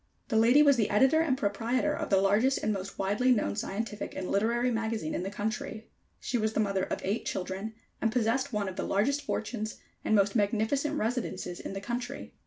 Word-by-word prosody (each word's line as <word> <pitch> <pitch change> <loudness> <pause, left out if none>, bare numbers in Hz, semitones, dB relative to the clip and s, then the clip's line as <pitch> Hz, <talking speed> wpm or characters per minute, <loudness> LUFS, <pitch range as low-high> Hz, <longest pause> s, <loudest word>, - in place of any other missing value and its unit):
The 225 - -1
lady 240 +7 +6
was 280 -3 +5
the 215 -3 +2
editor 265 +9 +4
and 280 -5 +1
proprietor 235 +6 0
of 310 0 -3
the 195 - +4
largest 210 +8 +3
and 215 - +1
most 195 0 -6
widely 205 +7 +2
known 215 -4 +1
scientific 210 +1 -4
and 185 - -4
literary 235 +5 +2
magazine 220 -7 -2
in - - -1
the 190 - -3
country. 215 +2 -4 0.3
She 245 - -1
was 220 0 0
the - - 0
mother 195 -3 +1
of - - -4
eight 200 +4 -1
children, 190 +4 -4 0.3
and 225 - +2
possessed 250 +4 +1
one 210 -3 -1
of 185 - -6
the - - -1
largest 275 +9 +1
fortunes 220 -5 -3 0.3
and 215 - +2
most 200 +1 +3
magnificent 225 +8 +1
residences 220 -7 -2
in - - -6
the 195 - -5
country. 240 +4 -5
220 Hz, 200 wpm, -29 LUFS, 200-250 Hz, 0.3 s, lady